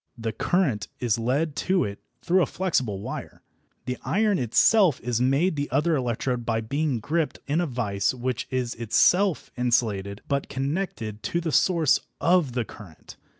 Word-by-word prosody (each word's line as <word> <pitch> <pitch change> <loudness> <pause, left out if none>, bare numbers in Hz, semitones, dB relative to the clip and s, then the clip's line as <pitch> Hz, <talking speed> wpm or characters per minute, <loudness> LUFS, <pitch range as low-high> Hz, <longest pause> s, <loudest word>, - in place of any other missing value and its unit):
The 115 -1 -3
current 135 - 0
is 120 -3 0
led 140 +6 0
to 185 -1 +1
it 100 0 -5 0.2
through 185 +2 +3
a - - +2
flexible 130 - -1
wire. - - -7 0.4
The 125 0 -3
iron 210 -2 +1
itself 160 - +4
is 120 0 -1
made 140 +8 +2
the 145 0 -2
other 160 +2 +2
electrode 125 -1 -1
by 115 -1 0
being 140 +2 -1
gripped 155 +7 -1
in 150 +4 +1
a 175 - -1
vice 105 -6 0
which 125 0 -3
is 125 -2 -1
itself 180 - +2
insulated 110 -5 0
but 140 -1 -1
connected 135 - -3
to 170 - -1
the 165 -2 -2
source 165 -3 +3 0.2
of 170 -5 +3
current. 90 -9 -13
130 Hz, 155 wpm, -25 LUFS, 115-165 Hz, 0.4 s, itself